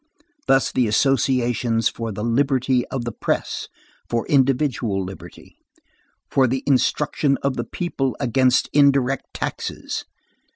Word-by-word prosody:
Thus 135 Hz, 0 st, +3 dB
the 125 Hz, -2 st, +1 dB
associations 120 Hz, -2 st, +1 dB
for 115 Hz, -1 st, -4 dB
the 105 Hz, +1 st, -5 dB
liberty 130 Hz, +1 st, +1 dB
of 125 Hz, -3 st, -4 dB
the 120 Hz, -, -3 dB
press, -, -, -2 dB, 0.4 s
for 115 Hz, -1 st, -1 dB
individual 130 Hz, -7 st, +1 dB
liberty, 95 Hz, +1 st, -11 dB, 0.7 s
for 135 Hz, -1 st, +4 dB
the 130 Hz, +2 st, -2 dB
instruction 140 Hz, +1 st, +1 dB
of 140 Hz, -1 st, 0 dB
the -, -, -3 dB
people 135 Hz, -7 st, -3 dB
against 125 Hz, +1 st, +2 dB
indirect 140 Hz, -2 st, +3 dB
taxes. -, -, -4 dB
130 Hz, 120 wpm, -22 LUFS, 120-135 Hz, 0.7 s, for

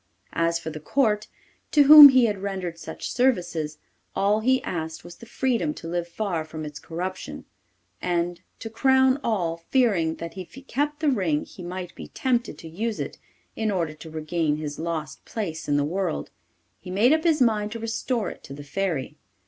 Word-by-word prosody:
As 170 Hz, 0 st, +1 dB
for 160 Hz, -1 st, -6 dB
the 155 Hz, -, -7 dB
Court, 210 Hz, -, +1 dB, 0.4 s
to 295 Hz, -, +5 dB
whom 295 Hz, 0 st, +12 dB
he 260 Hz, -2 st, +5 dB
had 210 Hz, -3 st, -1 dB
rendered 190 Hz, -4 st, -4 dB
such -, -, -6 dB
services, 175 Hz, -, 0 dB, 0.4 s
all 200 Hz, +2 st, +2 dB
he 260 Hz, +4 st, +3 dB
asked 160 Hz, -2 st, -4 dB
was 175 Hz, -, -11 dB
the 235 Hz, -, -13 dB
freedom 225 Hz, -, 0 dB
to -, -, -8 dB
live 175 Hz, 0 st, -2 dB
far 175 Hz, -3 st, -2 dB
from 155 Hz, 0 st, -7 dB
its 150 Hz, -1 st, -8 dB
corruption; 170 Hz, -, -6 dB, 0.6 s
and, 175 Hz, 0 st, -1 dB, 0.2 s
to 225 Hz, -, -7 dB
crown 265 Hz, +3 st, +3 dB
all, 175 Hz, -7 st, 0 dB
fearing 195 Hz, -12 st, +2 dB
that 170 Hz, 0 st, -7 dB
if 185 Hz, -, -9 dB
he 270 Hz, -, -11 dB
kept 290 Hz, +3 st, -2 dB
the 305 Hz, -, +3 dB
ring 180 Hz, -, 0 dB
he -, -, -12 dB
might 180 Hz, 0 st, -6 dB
be -, -, -9 dB
tempted 245 Hz, -, -1 dB
to 165 Hz, -, -10 dB
use 210 Hz, +7 st, -3 dB
it -, -, -5 dB, 0.4 s
in 220 Hz, -1 st, -1 dB
order 170 Hz, -6 st, -1 dB
to 155 Hz, +1 st, -11 dB
regain 155 Hz, 0 st, -1 dB
his 150 Hz, -1 st, -5 dB
lost 160 Hz, -2 st, -4 dB
place 170 Hz, -8 st, -5 dB
in 145 Hz, -1 st, +2 dB
the 145 Hz, -, +2 dB
world, 180 Hz, +1 st, -2 dB, 0.5 s
he -, -, -11 dB
made 215 Hz, +9 st, +4 dB
up 315 Hz, 0 st, +1 dB
his 325 Hz, -3 st, +3 dB
mind 215 Hz, -4 st, +2 dB
to -, -, -4 dB
restore 225 Hz, -1 st, -2 dB
it -, -, -13 dB
to 135 Hz, -, -9 dB
the 145 Hz, -, -9 dB
Fairy. 160 Hz, -2 st, -3 dB
185 Hz, 190 wpm, -25 LUFS, 160-230 Hz, 0.6 s, whom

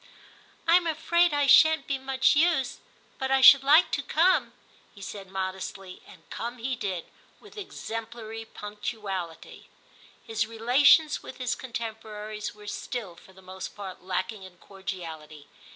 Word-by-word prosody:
* -, -, -29 dB
Tm 340 Hz, 0 st, +4 dB
afraid 340 Hz, +2 st, +2 dB
I 290 Hz, -1 st, +1 dB
shan't 300 Hz, +1 st, +6 dB
be 275 Hz, -1 st, -2 dB
much 265 Hz, +1 st, +2 dB
use, 300 Hz, -5 st, +2 dB, 0.4 s
but 265 Hz, -, -2 dB
I 270 Hz, 0 st, +3 dB
should 275 Hz, 0 st, +10 dB
like 295 Hz, +5 st, +5 dB
to 285 Hz, -, 0 dB
come,* 335 Hz, +6 st, +2 dB, 0.4 s
he -, -, -14 dB
said 195 Hz, -1 st, -8 dB
modestly, 190 Hz, 0 st, -5 dB
and -, -, -17 dB
come 240 Hz, +2 st, -5 dB
he 255 Hz, +2 st, -3 dB
did 190 Hz, -7 st, -4 dB, 0.3 s
with 420 Hz, +1 st, -17 dB
exemplary 225 Hz, -, -7 dB
punctuality. 205 Hz, -6 st, -7 dB, 0.6 s
His 225 Hz, 0 st, -1 dB
relations 260 Hz, +7 st, +4 dB
with -, -, -10 dB
his 250 Hz, -2 st, -1 dB
contemporaries 220 Hz, -3 st, -6 dB
were 210 Hz, 0 st, -14 dB
still, 205 Hz, -3 st, -5 dB
for 190 Hz, -, -18 dB
the 190 Hz, 0 st, -18 dB
most 185 Hz, 0 st, -8 dB
part, 195 Hz, -3 st, -8 dB
lacking 185 Hz, +3 st, -3 dB
in 185 Hz, -1 st, -13 dB
cordiality. 165 Hz, -7 st, -8 dB
225 Hz, 145 wpm, -27 LUFS, 190-270 Hz, 0.6 s, should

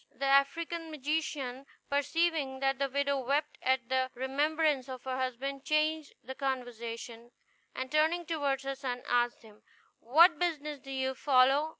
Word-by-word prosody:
The 275 Hz, -, -4 dB
African 325 Hz, +5 st, +2 dB
magician, 285 Hz, -3 st, -3 dB, 0.2 s
perceiving 285 Hz, -1 st, 0 dB
that 270 Hz, 0 st, 0 dB
the 275 Hz, -1 st, 0 dB
widow 280 Hz, +1 st, 0 dB
wept 280 Hz, +4 st, -1 dB
at 260 Hz, -2 st, +1 dB
the 260 Hz, 0 st, +1 dB
remembrance 285 Hz, +1 st, 0 dB
of 255 Hz, -1 st, -7 dB
her 260 Hz, -1 st, -3 dB
husband, 260 Hz, +2 st, -3 dB
changed 310 Hz, 0 st, 0 dB
the 265 Hz, -, -6 dB
conversation, 240 Hz, -3 st, -5 dB, 0.5 s
and 260 Hz, 0 st, -4 dB
turning 320 Hz, +3 st, +2 dB
toward 285 Hz, -4 st, -1 dB
her 275 Hz, 0 st, -2 dB
son, 255 Hz, -2 st, -4 dB
asked 240 Hz, 0 st, +1 dB
him, 215 Hz, -1 st, -17 dB, 0.4 s
"What 330 Hz, +9 st, +5 dB
business 300 Hz, -4 st, -2 dB
do 270 Hz, -, -13 dB
you 265 Hz, 0 st, -1 dB
follow? 270 Hz, +3 st, +4 dB
275 Hz, 150 wpm, -31 LUFS, 260-305 Hz, 0.5 s, What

